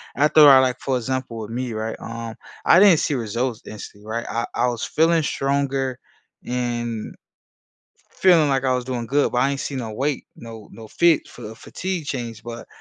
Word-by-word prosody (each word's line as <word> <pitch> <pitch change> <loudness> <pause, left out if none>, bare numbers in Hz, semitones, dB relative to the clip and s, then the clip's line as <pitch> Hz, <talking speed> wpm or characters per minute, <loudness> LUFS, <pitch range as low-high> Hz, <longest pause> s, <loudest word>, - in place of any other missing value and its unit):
After 150 +1 +6
I, 135 -1 +9
like, 130 -1 +1
for 130 -2 -1
example, 130 -1 -3
with 110 0 -7
me, 125 0 -3
right, 110 +1 -3
um, 115 0 -7 0.3
I 175 - +7
didn't 190 -6 +7
see - - 0
results 115 0 -2
instantly, 105 0 -10
right? 115 +1 -3
I 115 - -1
I 125 - +2
was 120 -2 -3
feeling 165 0 +2
stronger, 135 -2 -1 0.5
and, 120 -2 -3 1.0
feeling 170 -5 +4
like 135 -1 0
I 130 -1 +2
was 125 -1 -2
doing 125 -3 -4
good, 140 +4 +1
but 125 - -1
I 135 +3 +3
ain't 140 0 -3
seen 140 - -4
no 115 -3 -5
weight, 135 +4 -2
no 115 -2 -11
no 110 -1 -11
fit 170 +3 +2
for 120 - -13
the 110 +1 -8
fatigue 185 +6 -5
change. 120 -5 -5
But, 120 -1 -8
125 Hz, 190 wpm, -22 LUFS, 115-140 Hz, 1.0 s, I